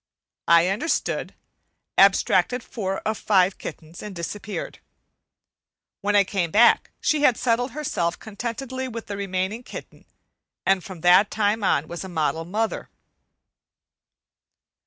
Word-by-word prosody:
I 170 Hz, 0 st, +6 dB
understood, 235 Hz, +13 st, -1 dB, 0.6 s
abstracted 195 Hz, +4 st, +4 dB
four 195 Hz, -6 st, -4 dB
of 220 Hz, 0 st, -2 dB
the -, -, -14 dB
five 190 Hz, -2 st, +3 dB
kittens, 165 Hz, +2 st, -9 dB
and 210 Hz, -2 st, -8 dB
disappeared. 200 Hz, +5 st, -5 dB, 1.2 s
When 205 Hz, +1 st, 0 dB
I 200 Hz, -, +6 dB
came 185 Hz, -3 st, -1 dB
back 225 Hz, +8 st, +5 dB
she 305 Hz, -1 st, +1 dB
had 255 Hz, -5 st, +4 dB
settled 245 Hz, +1 st, 0 dB
herself 180 Hz, -, -2 dB
contentedly 245 Hz, +4 st, -5 dB
with 230 Hz, -2 st, -7 dB
the 205 Hz, -, -5 dB
remaining 195 Hz, +2 st, -2 dB
kitten, -, -, -11 dB, 0.6 s
and 190 Hz, -2 st, +2 dB
from 185 Hz, -4 st, -9 dB
that 180 Hz, +4 st, +6 dB
time 210 Hz, 0 st, 0 dB
on 155 Hz, -5 st, +1 dB
was 170 Hz, +3 st, -6 dB
a 190 Hz, -, -7 dB
model 160 Hz, -1 st, -1 dB
mother. 215 Hz, +5 st, -2 dB
200 Hz, 130 wpm, -24 LUFS, 180-230 Hz, 1.2 s, I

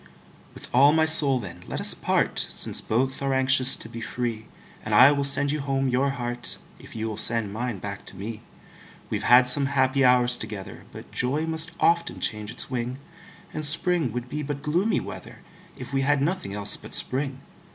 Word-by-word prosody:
With -, -, -9 dB
all 140 Hz, +4 st, +5 dB
my 160 Hz, 0 st, +2 dB
soul, 150 Hz, -4 st, +8 dB
then, 95 Hz, -8 st, -9 dB
let -, -, -5 dB
us -, -, +4 dB
part, -, -, -1 dB
Since -, -, -1 dB
both 130 Hz, +5 st, -2 dB
are 135 Hz, -1 st, -1 dB
anxious 130 Hz, 0 st, +5 dB
to -, -, -10 dB
be 115 Hz, 0 st, -9 dB
free; 115 Hz, -2 st, -5 dB, 0.4 s
And 105 Hz, 0 st, -2 dB
I 130 Hz, +6 st, +7 dB
will 140 Hz, -1 st, -1 dB
sand 140 Hz, +1 st, +3 dB
you 150 Hz, -, -3 dB
home 135 Hz, -1 st, -1 dB
your 130 Hz, +3 st, 0 dB
heart, 120 Hz, -2 st, -4 dB, 0.2 s
If -, -, -15 dB
you 110 Hz, 0 st, -4 dB
will 110 Hz, -2 st, -6 dB
send 110 Hz, -2 st, -1 dB
mine 120 Hz, -1 st, -4 dB
back 100 Hz, +1 st, -8 dB
to -, -, -12 dB
me. 105 Hz, +3 st, -7 dB, 0.7 s
We've -, -, -2 dB
had 125 Hz, +1 st, +5 dB
some 135 Hz, +2 st, +4 dB
happy 135 Hz, 0 st, +1 dB
hours 125 Hz, -1 st, +3 dB
together, 100 Hz, -3 st, -9 dB
But -, -, -12 dB
joy 140 Hz, +5 st, -1 dB
must 160 Hz, +1 st, -3 dB
often 170 Hz, 0 st, +1 dB
change 105 Hz, -2 st, -4 dB
its 120 Hz, -, +1 dB
wing; 125 Hz, 0 st, -4 dB, 0.6 s
And 155 Hz, -, -5 dB
spring 165 Hz, -2 st, 0 dB
would 125 Hz, +2 st, -6 dB
be 150 Hz, +4 st, -5 dB
but 145 Hz, -1 st, -6 dB
gloomy 175 Hz, +9 st, 0 dB
weather, -, -, -10 dB, 0.4 s
If -, -, -9 dB
we 135 Hz, -, 0 dB
had 140 Hz, +1 st, +1 dB
nothing 140 Hz, -, -3 dB
else 100 Hz, -1 st, +1 dB
but -, -, -2 dB
spring. 135 Hz, 0 st, -1 dB
130 Hz, 195 wpm, -24 LUFS, 115-140 Hz, 0.7 s, soul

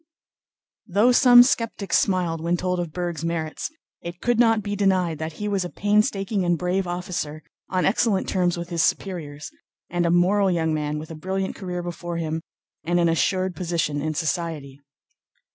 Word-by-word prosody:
Though 210 Hz, +6 st, +4 dB
some 245 Hz, -1 st, +8 dB
skeptics 230 Hz, -5 st, +1 dB
smiled 175 Hz, -4 st, 0 dB
when 170 Hz, +2 st, 0 dB
told 180 Hz, 0 st, -1 dB
of 170 Hz, -2 st, -3 dB
Berg's 175 Hz, -2 st, -4 dB
merits, 165 Hz, -2 st, -3 dB, 0.3 s
it 170 Hz, +1 st, -7 dB
could 240 Hz, +2 st, +1 dB
not 225 Hz, -3 st, +4 dB
be 205 Hz, 0 st, -3 dB
denied 185 Hz, -5 st, +1 dB
that 160 Hz, 0 st, -4 dB
he 210 Hz, +6 st, -5 dB
was 200 Hz, -2 st, 0 dB
a 175 Hz, -, -5 dB
painstaking 205 Hz, -1 st, +1 dB
and 175 Hz, -1 st, +1 dB
brave 180 Hz, +2 st, -1 dB
officer, 175 Hz, -4 st, -4 dB, 0.3 s
on 185 Hz, -1 st, 0 dB
excellent 200 Hz, -1 st, +1 dB
terms 180 Hz, -2 st, +1 dB
with 170 Hz, 0 st, -6 dB
his 170 Hz, -2 st, 0 dB
superiors, 150 Hz, -8 st, -2 dB, 0.4 s
and 175 Hz, 0 st, +1 dB
a -, -, +2 dB
moral 190 Hz, +3 st, +3 dB
young 165 Hz, -3 st, 0 dB
man 150 Hz, -1 st, -2 dB
with 155 Hz, +2 st, -7 dB
a -, -, -6 dB
brilliant 190 Hz, +4 st, -3 dB
career 180 Hz, -3 st, -5 dB
before 175 Hz, 0 st, -5 dB
him 160 Hz, -1 st, -2 dB, 0.4 s
and 175 Hz, +1 st, +1 dB
an 170 Hz, -1 st, +3 dB
assured 185 Hz, +2 st, 0 dB
position 165 Hz, -5 st, -1 dB
in 155 Hz, +1 st, -2 dB
society. 155 Hz, -4 st, -3 dB
175 Hz, 175 wpm, -24 LUFS, 165-195 Hz, 0.4 s, some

